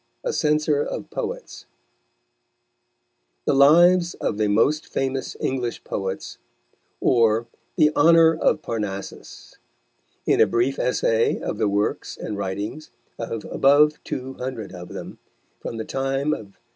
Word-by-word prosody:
A - - -2
CENSOR 150 -1 +1
OF - - -5
POETS - - -6 1.8
The - - +2
Lives 170 +5 +5
of 105 - -3
The 105 - +2
Most 140 +9 +2
Famous 135 0 -3
English 125 -3 -2
Poets, 95 -1 -5 0.6
_or 115 -2 +3 0.3
the 155 -2 +3
Honour 165 +1 +6
of 155 -1 +1
Parnassus; 105 -4 -6 0.7
in - - +3
a - - +6
Brief 125 +4 0
Essay 115 -2 +1
of - - -4
the 105 - +2
Works 100 +1 -2
and 105 - -5
Writings 100 +9 -5 0.3
of 115 -1 -5
above 150 +2 +3
Two 130 +1 -5
Hundred 125 -6 -5
of 90 -1 -9
them, - - -8 0.4
from 115 - -6
the 110 - -4
Time 135 +2 -1
of 100 -7 -7
K. - - -36
130 Hz, 130 wpm, -23 LUFS, 110-150 Hz, 1.8 s, Honour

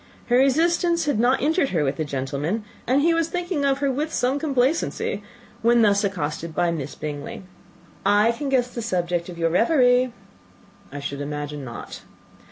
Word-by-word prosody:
Her 240 - +4
resistance 335 +5 +3
had 290 -7 0
not 250 +3 +3
injured 305 -1 +2
her 165 -5 +1
with 140 0 -1
the 155 - -1
gentleman, 145 +8 -2 0.2
and 270 +4 +3
he 335 +1 +4
was 330 -1 +1
thinking 350 -4 -2
of 275 -1 +2
her 280 -1 +2
with 300 +4 -2
some 260 +3 0
complacency, 280 +1 0 0.4
when 235 0 +4
thus 200 -1 +3
accosted 165 -4 -3
by 175 -1 +2
Miss 145 -4 -5
Bingley, 150 +3 -6 0.6
"I 205 +3 +4
can 275 +4 -4
guess 250 -2 +1
the 235 - -4
subject 175 -5 -1
of 175 - -8
your 165 -1 +1
reverie." 250 - +4 0.8
"I 145 - -6
should 140 0 -5
imagine 145 0 -5
not." 120 -2 -8
230 Hz, 175 wpm, -23 LUFS, -, 0.8 s, Her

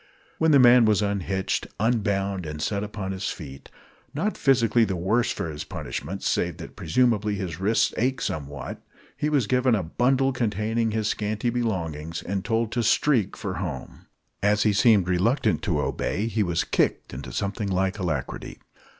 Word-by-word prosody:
When 160 - +3
the 145 - +7
man 125 -2 +7
was 105 -1 +3
unhitched, 100 -1 -1
unbound, 100 -5 0
and 75 0 -6
set 100 +5 -1
upon 105 -2 -5
his 95 0 -3
feet, 70 -5 -9 0.5
not 205 +8 -1
physically 120 -4 +3
the 95 -3 -1
worse 110 +8 +1
for - - -3
his 75 -2 -5
punishment 95 +7 -6
save - - 0
that, - - -10
presumably, 115 -5 +1
his 90 -5 -5
wrists 105 +4 +2
ached 125 +1 0
somewhat, 70 -3 -5 0.3
he 150 - -1
was 145 -6 +2
given 125 +1 +2
a 100 - -1
bundle 130 +10 +2
containing 115 -1 0
his 110 -1 -1
scanty 110 +3 -1
belongings, 85 -9 -3
and 95 0 -3
told 115 +2 0
to 120 - 0
"streak" 115 -2 +2
for 95 -2 -4
home. 80 -9 -6 0.3
As 105 +1 +3
he 105 - +3
seemed 100 -3 +4
reluctant 95 +9 +1
to 85 -7 +1
obey, 100 +7 -1
he 115 -1 -1
was 85 -4 +1
kicked - - 0
into 65 -1 -7
something 100 - -2
like 95 +2 0
alacrity. 80 -8 -3
105 Hz, 165 wpm, -25 LUFS, 95-115 Hz, 0.5 s, the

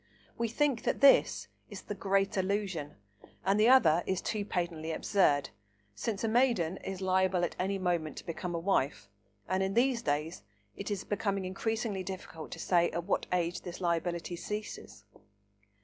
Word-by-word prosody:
We 235 - -1
think 265 +1 +1
that - - -1
this 280 -1 +5 0.2
is - - -8
"The - - -5
Great 195 0 +1
Illusion," 190 -6 -1 0.5
and 195 +2 +3
the 220 +3 +6
other 175 -11 +6
is 190 -1 0
too 215 -2 -2
patently 170 -5 -3
absurd, 150 -6 +2 0.4
since 205 - -3
a - - +2
maiden 220 -7 +2
is 190 -1 -6
liable 185 -1 +2
at - - -5
any 195 +2 0
moment 175 -4 -1
to - - -8
become 175 +1 -4
a - - -1
wife, 145 - 0 0.4
and, 185 0 0
in 190 0 -1
these 245 0 +3
days, 150 - -2 0.3
it 200 - -5
is 200 -2 -2
becoming 200 -2 -1
increasingly 215 +1 -2
difficult 180 -4 -7
to - - -8
say 175 -2 +3
at 170 - -3
what - - -1
age 175 -1 0
this 175 0 -7
liability 170 0 -1
ceases. 210 +4 -6
190 Hz, 165 wpm, -31 LUFS, 170-205 Hz, 0.5 s, the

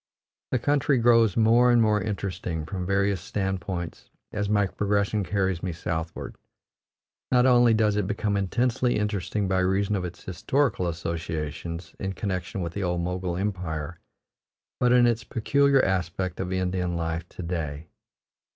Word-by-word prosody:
The 130 - +1
country 140 +2 +2
grows 115 -3 +4
more 115 +2 +5
and 120 - +5
more 105 -2 +3
interesting 95 -6 -3
from 90 +1 -4
various 100 -1 +1
standpoints 95 -3 -4 0.2
as 105 -1 -2
my 105 -1 +3
progression 100 +1 0
carries 95 -3 0
me 90 - -2
southward. 80 0 -4 0.9
Not 125 -1 +5
only 120 -3 +5
does 105 -2 +2
it 105 -3 0
become 105 0 -1
intensely 120 +5 +1
interesting 105 -1 -1
by 95 0 +1
reason 95 +2 +1
of 95 - -2
its 90 -1 -7
historical 100 - 0
associations 85 0 -4
in 95 0 -3
connection 95 -1 -3
with 85 -1 -4
the 100 - -3
old 90 -2 0
Mogul 90 0 -2
Empire, 90 -5 -3 0.8
but 125 -1 +3
in 125 -1 +6
its 115 -2 +1
peculiar 140 +4 +2
aspect 90 -1 -1
of 95 -1 -3
Indian 90 -1 -1
life 85 +1 -3
to 90 - -8
day. 80 -3 -4
95 Hz, 150 wpm, -26 LUFS, 85-110 Hz, 0.9 s, in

